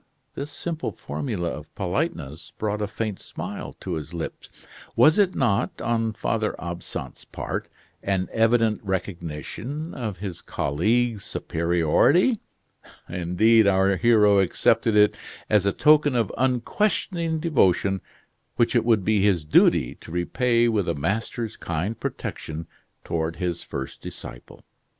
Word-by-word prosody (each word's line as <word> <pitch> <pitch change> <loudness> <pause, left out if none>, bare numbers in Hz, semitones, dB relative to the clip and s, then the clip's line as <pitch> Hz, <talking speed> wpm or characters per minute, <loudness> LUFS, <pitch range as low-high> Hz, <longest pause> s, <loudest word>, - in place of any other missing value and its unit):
This 140 +1 -5
simple 160 +2 -4
formula 100 -11 -3
of - - -8
politeness 90 - -3
brought 105 0 -2
a 105 - 0
faint 105 -1 -4
smile - - -7
to - - -4
his 80 +2 -5
lips. 85 - -7 0.3
Was 155 +6 +6
it 195 -3 +3
not, 120 -3 +1
on 115 -1 0
Father 110 0 -1
Absinthe's 85 -6 -6
part, - - -5 0.3
an 95 -2 0
evident 115 -1 +2
recognition 95 - -4
of 110 -7 -4
his 95 -2 -6
colleague's 110 +8 0
superiority. 85 - +2 0.7
Indeed, 95 +6 +3
our 95 0 +3
hero 105 -1 +5
accepted 95 +3 +2
it 105 0 +5 0.3
as 105 -2 +4
a - - +4
token 150 +2 +4
of 115 -5 +1
unquestioning 160 - 0
devotion 95 - +2 0.5
which 120 0 +2
it 120 - +4
would 110 -5 +2
be 110 -2 +3
his 90 -7 +2
duty 65 -4 +4
to - - -11
repay 115 +7 +2
with 105 -6 +1
a 85 - 0
master's 110 - -2
kind 85 +7 -3
protection 80 +1 -5 0.4
toward 80 0 -2
his 90 -2 -2
first 65 - -6
disciple. - - -10
105 Hz, 130 wpm, -24 LUFS, 85-120 Hz, 0.7 s, Was